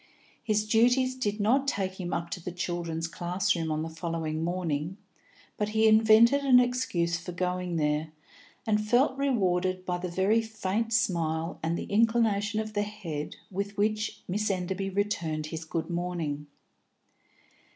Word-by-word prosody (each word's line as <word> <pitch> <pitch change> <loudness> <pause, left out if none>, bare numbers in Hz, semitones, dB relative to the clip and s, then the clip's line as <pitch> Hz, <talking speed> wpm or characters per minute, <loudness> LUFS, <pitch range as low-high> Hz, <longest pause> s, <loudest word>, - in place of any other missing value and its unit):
His 215 -1 +1
duties 245 +4 +3
did 210 -5 -2
not 260 +7 +2
take 190 -7 -2
him 175 - -4
up 170 0 -3
to 180 - -5
the 180 - -4
children's 170 -2 -3
classroom 175 +1 -1
on 155 0 -1
the - - -3
following 160 -1 -3
morning, 170 0 -2 0.6
but 210 0 -1
he 220 +1 +3
invented 220 +5 +6
an 260 -3 +6
excuse 215 -10 0
for 180 +1 -7
going 180 0 -2
there, 150 0 0 0.5
and 210 -2 +2
felt 245 +5 +3
rewarded 185 -9 0
by 180 -1 -1
the 180 0 -4
very 195 +6 +2
faint 220 0 -2
smile 165 -6 0
and 165 +1 -1
the - - -3
inclination 215 -1 +2
of 215 0 -4
the 205 - +1
head 195 -8 -5 0.2
with 200 +2 -4
which 215 0 -1
Miss 210 +3 -1
Enderby 190 +1 -2
returned 185 -6 -1
his 160 +1 -6
"good 165 +1 -3
morning." 170 -4 -3
190 Hz, 150 wpm, -28 LUFS, 170-215 Hz, 0.6 s, invented